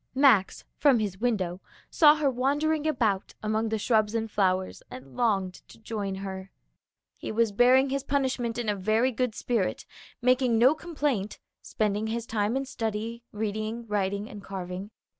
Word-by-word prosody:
Max, 255 -8 +4
from 280 -4 +5
his 200 -4 -3
window, 195 -7 -1 0.3
saw 300 -2 +6
her 295 -3 +1
wandering 290 +5 0
about 220 -10 0
among 220 +1 0
the 220 - 0
shrubs 215 0 +1
and 225 -1 -2
flowers 185 -2 0
and 130 +1 -11
longed 195 -6 0
to - - -15
join 210 -3 -4
her. 190 0 -6 0.7
He - - -5
was 225 0 +2
bearing 255 +5 +4
his 275 0 0
punishment 260 -5 -1
in 240 -2 -3
a 210 - +1
very 215 +6 +1
good 250 -2 -1
spirit, 230 -6 -1 0.3
making 250 -2 +3
no 250 +5 +6
complaint, 290 - -2 0.2
spending 210 0 -1
his 230 +1 -3
time 220 +2 0
in 270 - -2
study, 225 -1 -4
reading, 215 +2 -3
writing 200 -1 -1
and 205 -3 -10
carving. 190 0 -6
220 Hz, 160 wpm, -27 LUFS, 200-255 Hz, 0.7 s, saw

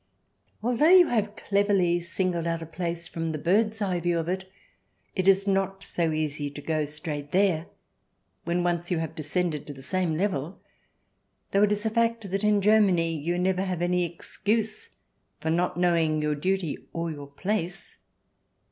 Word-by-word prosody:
Although 245 +7 +3
you 360 -2 +7
have 215 -3 0
cleverly 200 -5 +2
singled 175 -1 -1
out 165 -1 -1
a - - -6
place 170 +1 -4
from 165 -1 -3
the 155 - -3
bird's 210 +7 +1
eye 185 -3 0
view 175 0 0
of 165 -1 -2
it, 190 +1 -3 0.6
it 185 -1 0
is 195 0 +5
not 195 -1 0
so 165 -2 -1
easy 150 -2 -2
to 145 - -9
go 155 0 -1
straight 150 -1 -5
there 180 -4 +2 0.8
when 175 +1 0
once 175 -1 -1
you 175 - +1
have 160 -1 -3
descended 155 0 -2
to 145 - -6
the 135 -1 -12
same 170 +2 0
level 180 -3 -2 0.5
— - - -47
though 200 - +3
it 210 0 +4
is 210 +1 0
a 220 - +1
fact 230 -3 0
that 195 +2 -1
in 210 -1 +3
Germany 190 -6 +4
you 165 +4 -2
never 185 +1 +1
have 180 -3 -2
any 180 0 +2
excuse 210 +6 -2 0.5
for 160 - -1
not 175 +1 0
knowing 165 -3 +2
your 150 0 0
duty 180 +1 -1
or 165 0 -2
your 145 -2 -8
place. 180 +4 -3
175 Hz, 175 wpm, -27 LUFS, 160-195 Hz, 0.8 s, you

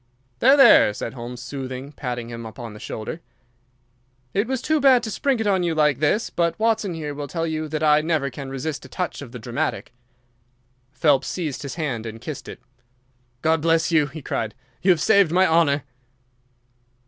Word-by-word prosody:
"There! 270 +4 +6
there!" 235 - +7
said 115 - -5
Holmes, 120 0 -7
soothing, 130 +1 -6
patting 120 -5 -5
him 115 0 -7
upon 115 0 -8
the 105 - -11
shoulder. 110 +12 -6 1.1
"It 205 +3 +1
was 260 0 -1
too 310 +4 +1
bad 260 -3 +5
to 220 - -4
spring 265 +4 0
it 220 - -1
on 195 -3 +2
you 170 -2 0
like 150 -4 +2
this, 155 +9 +1
but 170 -1 0
Watson 220 -5 0
here 150 -2 -4
will 145 0 -5
tell 165 +2 -2
you 155 -1 -3
that 155 0 -3
I 150 0 +5
never 155 -4 0
can 135 +2 -7
resist 135 +3 -4
a 130 - -12
touch 180 +3 -4
of 135 -5 -9
the 125 - -7
dramatic." 120 +1 -3 1.0
Phelps 140 -1 +2
seized 155 -7 -3
his 140 -3 -6
hand 130 -9 -3
and 110 0 -8
kissed - - -7
it. - - -9 0.8
"God 160 0 +2
bless 165 +1 +2
you!" 155 -3 +3
he 155 0 -9
cried. 110 -3 -3 0.3
"You 190 - +1
have 175 -4 +4
saved 200 -5 +4
my 185 +2 +4
honour." 160 -5 +3
155 Hz, 190 wpm, -23 LUFS, 130-175 Hz, 1.1 s, there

